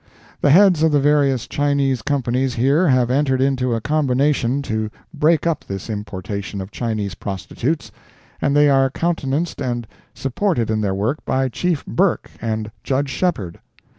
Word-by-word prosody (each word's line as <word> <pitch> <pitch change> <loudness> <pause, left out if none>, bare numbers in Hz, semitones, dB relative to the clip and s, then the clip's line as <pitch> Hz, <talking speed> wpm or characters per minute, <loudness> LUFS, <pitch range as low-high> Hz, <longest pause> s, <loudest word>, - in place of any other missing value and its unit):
The 145 - +3
heads 180 +1 +6
of 160 0 +4
the 145 - +4
various 140 -3 +2
Chinese 140 -3 +1
Companies 130 -1 0
here 140 +9 +3
have 125 -3 +3
entered 135 -1 +2
into 130 -2 +1
a 115 - -3
combination 140 -1 +1
to 110 -3 -2 0.2
break 155 +1 +2
up 165 -2 0
this 95 +3 -6
importation 100 -1 -5
of 95 +2 -7
Chinese 110 -4 -3
prostitutes, 110 - -3 0.5
and 140 - +1
they 145 0 +6
are 135 -1 +4
countenanced 160 0 -2
and 120 -3 -2 0.3
supported 135 - -1
in 110 -1 0
their 100 -2 0
work 110 +10 -1
by 130 0 0
Chief 170 +4 -1
Burke 190 0 0
and 110 -2 -3
Judge 135 0 -1
Shepheard. 125 - -2
135 Hz, 155 wpm, -20 LUFS, 115-145 Hz, 0.5 s, heads